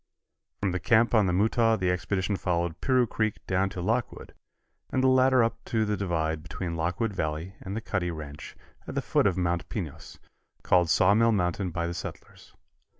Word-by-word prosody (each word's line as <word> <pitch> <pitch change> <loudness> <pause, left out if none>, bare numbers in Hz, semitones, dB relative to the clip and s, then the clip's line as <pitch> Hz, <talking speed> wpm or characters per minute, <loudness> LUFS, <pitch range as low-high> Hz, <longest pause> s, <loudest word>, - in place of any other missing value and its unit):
From 100 -2 +1
the 90 - -2
camp 115 +2 +3
on 105 -4 +4
the - - +1
Mutaw 110 +4 +2
the 90 -2 +1
expedition 95 +2 -1
followed 85 -3 -2
Piru 130 -2 +3
Creek 110 -1 -1
down 95 +1 +1
to 90 - -6
Lockwood, 115 +4 -2 0.6
and 130 - 0
the - - +5
latter 130 -1 +5
up 115 0 -2
to 110 -1 0
the 105 0 0
divide 80 -5 -1
between 85 +1 -5
Lockwood 90 +7 -1
Valley 80 +2 -3
and 95 +1 -6
the 110 - -3
Cuddy 95 -5 -2
ranch 75 -3 -8 0.3
at - - -6
the - - 0
foot - - +2
of 95 -2 0
Mount 85 -1 -1
Pinos, 85 -10 -6 0.5
called 90 -2 +3
Sawmill 110 +8 +4
Mountain 90 -1 0
by 85 0 -2
the 85 - -3
settlers. 85 - -9
95 Hz, 185 wpm, -27 LUFS, 85-110 Hz, 0.6 s, the